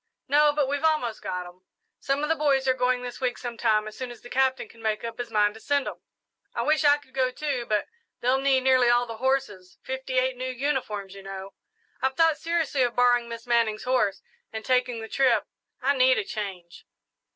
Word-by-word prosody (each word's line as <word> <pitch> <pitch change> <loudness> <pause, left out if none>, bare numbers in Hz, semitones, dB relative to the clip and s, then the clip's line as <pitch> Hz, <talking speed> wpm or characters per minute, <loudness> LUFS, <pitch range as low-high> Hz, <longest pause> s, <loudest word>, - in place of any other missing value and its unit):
"No, 295 +2 +5
but 290 -2 0
we've 285 +2 -2
almost 305 -9 +1
got 180 0 -4
'em. 180 +1 -14 0.4
Some 275 +2 -1
of 300 - -1
the 325 - +3
boys 275 -3 +2
are 260 - +5
going 250 0 0
this 245 +1 -7
week 250 -1 0
sometime, 230 -3 0
as 215 - -8
soon 255 -1 -5
as 240 - -11
the 245 - -13
Captain 265 -2 +1
can 230 - -17
make 220 -1 -1
up 230 0 -6
his 245 - -4
mind 210 -1 +2
to 220 - -12
send 285 +3 0
'em. - - -7 0.5
I - - 0
wish 310 +1 +2
I 290 0 +6
could 285 -3 -21
go, 260 -1 +1
too, 255 -2 -3
but 210 -1 0 0.3
they'll 255 +2 +2
need 270 -1 +3
nearly 255 -2 +4
all 240 0 +4
the 230 -2 -7
horses 255 -8 -1
fifty 265 0 -4
eight 255 0 +2
new 255 +1 -3
uniforms, 250 -7 -2
you 195 - -10
know. 195 0 -8 0.5
I've 265 0 0
thought 325 -2 +3
seriously 325 -3 0
of 245 -1 +1
borrowing 245 -1 +3
Miss 230 0 -7
Manning's 230 -3 +1
horse 210 -7 +1 0.3
and 220 -1 -6
taking 250 -2 +1
the 220 - -6
trip 245 -3 +2 0.4
I 280 +2 +3
need 255 0 +4
a - - 0
change." 190 -5 -7
250 Hz, 220 wpm, -26 LUFS, 220-270 Hz, 0.5 s, I